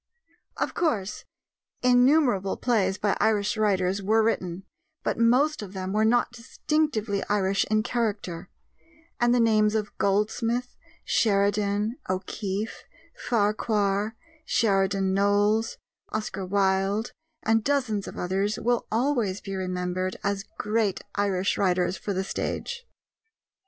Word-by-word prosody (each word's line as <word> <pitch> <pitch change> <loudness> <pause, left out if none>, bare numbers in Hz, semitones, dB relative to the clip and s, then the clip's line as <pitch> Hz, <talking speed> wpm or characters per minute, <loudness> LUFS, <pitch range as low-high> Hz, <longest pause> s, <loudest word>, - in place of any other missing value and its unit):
Of - - -1
course, 215 - -1 0.6
innumerable 250 -5 +4
plays 200 -6 +1
by 205 -1 +1
Irish 210 0 +2
writers 195 -2 +1
were 220 +3 +3
written, 185 -5 -1 0.4
but - - -1
most 255 +6 +3
of 200 -2 -8
them 190 0 -4
were 215 +1 +3
not 240 +2 +3
distinctively 230 -3 -1
Irish 195 -1 +2
in 215 0 +2
character; 205 -8 -2 0.7
and 240 0 +3
the 245 - +3
names 215 -2 +3
of 210 -1 -2
Goldsmith, 225 +5 0 0.3
Sheridan, 205 +1 +1
O'Keeffe, 195 +3 -3 0.3
Farquhar, 210 -1 0 0.3
Sheridan 195 -7 +1
Knowles, 205 +3 +2 0.3
Oscar 210 -3 -4
Wilde, 195 +2 +1 0.3
and 225 0 +2
dozens 245 -8 0
of - - -8
others 195 +4 -1
will 235 +1 0
always 230 -5 +1
be 195 -1 -6
remembered 185 0 -2
as 200 0 -1
great 210 -3 0
Irish 200 -2 0
writers 180 -1 +1
for 205 - -5
the 190 0 -1
stage. 475 - -4
210 Hz, 115 wpm, -26 LUFS, 195-230 Hz, 0.7 s, innumerable